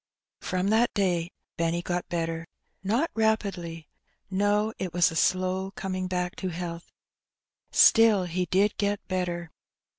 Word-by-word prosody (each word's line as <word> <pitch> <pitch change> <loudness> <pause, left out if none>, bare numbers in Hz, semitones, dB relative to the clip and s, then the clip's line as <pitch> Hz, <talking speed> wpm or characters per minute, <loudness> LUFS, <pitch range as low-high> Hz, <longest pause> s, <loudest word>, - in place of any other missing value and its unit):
From 185 +1 -1
that 230 +2 +3
day 175 -4 +1 0.3
Benny 170 +1 0
got 175 0 -3
better. 165 -1 -3 0.4
Not 235 +12 +1
rapidly; 195 -7 -1 0.4
no, 205 +3 +1
it 180 -2 -4
was 175 -2 +4
a - - -7
slow 185 +3 +1
coming 185 -1 -3
back 180 -1 -2
to 190 - -3
health; 170 0 -6 0.8
still, 225 -4 +6
he 180 +1 -2
did 200 +4 +2
get 205 0 -1
better. 175 -3 -3
185 Hz, 130 wpm, -27 LUFS, 175-200 Hz, 0.8 s, still